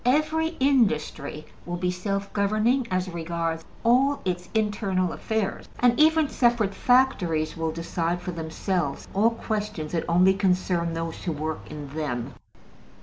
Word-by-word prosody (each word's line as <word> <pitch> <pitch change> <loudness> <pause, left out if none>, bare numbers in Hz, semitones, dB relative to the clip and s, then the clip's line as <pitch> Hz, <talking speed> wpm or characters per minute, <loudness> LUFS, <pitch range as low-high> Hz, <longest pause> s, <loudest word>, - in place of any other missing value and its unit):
Every 310 +5 +1
industry 155 - +1 0.2
will 175 - -4
be 180 0 0
self 195 +2 -3
governing 215 +5 +2
as 185 -1 0
regards 165 -1 -3 0.2
all 265 +5 +4
its 180 -1 -2
internal 205 -4 0
affairs, 220 -3 -2
and 245 +1 +4
even 315 0 +5
separate 235 -6 +2
factories 190 -13 +2
will 165 0 -1
decide 165 +1 -2
for 180 - -5
themselves 165 -1 -2
all 210 +4 +4
questions 210 -8 -4
that 165 - -1
only 180 +3 +5
concern 180 -3 +1
those 165 0 -4
who 175 - 0
work 155 +1 -3
in 150 -1 -7
them. 135 -4 -3
185 Hz, 140 wpm, -26 LUFS, 165-230 Hz, 0.2 s, even